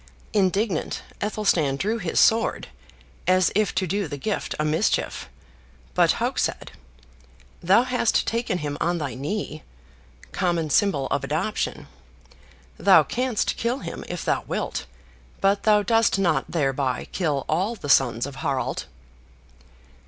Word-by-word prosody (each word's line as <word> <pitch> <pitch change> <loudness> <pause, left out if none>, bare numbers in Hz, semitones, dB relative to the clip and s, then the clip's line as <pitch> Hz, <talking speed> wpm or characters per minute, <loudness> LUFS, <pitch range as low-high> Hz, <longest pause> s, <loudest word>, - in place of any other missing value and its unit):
Indignant 195 -2 0 0.2
Athelstan 195 -9 +1
drew 215 +10 -1
his 180 -5 0
sword, 225 +1 +3 0.6
as 185 -1 +4
if 210 -1 +1
to 185 0 +1
do 195 +1 -1
the 145 -1 -6
gift 205 +8 -3
a 150 - 0
mischief; 155 +1 0 0.6
but - - +4
Hauk - - -1
said, - - -2 0.9
"Thou 195 +7 +5
hast 250 -3 +1
taken 230 -5 -1
him 145 -3 -4
on 175 +1 +1
thy 145 -6 -3
knee 150 - -4 0.7
[common 170 -5 0
symbol 150 -6 +2
of 140 - 0
adoption]; 170 +8 -2 0.9
thou - - +6
canst 250 -3 -1
kill 235 +3 0
him - - -7
if - - -5
thou - - +1
wilt; - - -3 0.5
but 200 +1 +2
thou 210 -1 +4
dost 225 -2 +3
not 175 -5 +1
thereby 135 -4 -1
kill 150 -7 -1
all 190 +9 0
the 170 - -8
sons 120 -4 +3
of 140 -1 -8
Harald." 140 -5 -2
180 Hz, 135 wpm, -24 LUFS, 150-210 Hz, 0.9 s, thou